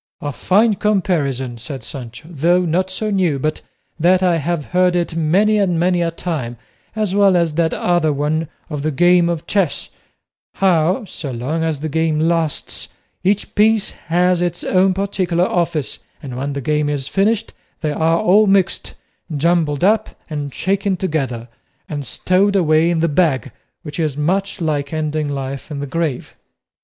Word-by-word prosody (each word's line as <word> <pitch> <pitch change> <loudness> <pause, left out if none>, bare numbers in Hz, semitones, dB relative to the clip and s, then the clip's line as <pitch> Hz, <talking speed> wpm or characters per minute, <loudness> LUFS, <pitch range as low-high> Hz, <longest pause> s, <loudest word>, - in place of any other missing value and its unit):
"A 145 - -4
fine 210 - +2
comparison!" 145 - 0
said 130 +3 -6
Sancho; 130 +1 -9
"though 175 +4 +2
not 180 +3 0
so 210 +3 -3
new 180 -7 +1
but 155 +3 -2 0.4
that 180 +3 +4
I 175 -2 +3
have 165 -1 -2
heard 180 0 +3
it 170 -2 -1
many 195 +7 +3
and 180 -4 +1
many 175 0 +2
a 170 - +1
time, 155 -8 -4 0.4
as 215 -3 -1
well 200 -2 +4
as 170 -3 +1
that 165 +1 +1
other 175 -3 +1
one 150 +3 -1 0.2
of 150 -4 -4
the 155 - 0
game 175 +3 +4
of 170 -2 -3
chess; 195 -7 0 0.7
how, 185 +4 +2
so 155 -6 -6
long 130 +7 -3
as 160 -3 -2
the 155 - -2
game 160 0 0
lasts, 165 -1 0 0.4
each 200 +2 0
piece 215 0 +3 0.2
has 180 +1 +2
its 175 -1 -2
own 185 0 +2
particular 185 -3 0
office, 170 -6 -1 0.2
and 130 -3 -6
when 140 +3 -3
the 140 - -4
game 150 +2 0
is 140 -2 -2
finished 205 +6 0 0.3
they 155 -2 0
are 165 +2 +1
all 205 +4 +5
mixed, 195 -1 +1 0.4
jumbled 160 -1 +1
up 215 +3 +1
and 145 -2 -3
shaken 195 +4 0
together, 135 -10 -2 0.4
and 145 -4 -5
stowed 195 - +1
away 160 -2 +3
in 170 -2 +1
the 165 - +3
bag, 145 -5 +1 0.3
which 150 +1 -7
is 155 -4 -1
much 195 +7 -1
like 145 -3 -1
ending 155 -1 -2
life 135 -1 -5
in 145 -2 -5
the 145 - -3
grave." 155 -2 -3
165 Hz, 170 wpm, -19 LUFS, 150-185 Hz, 0.7 s, all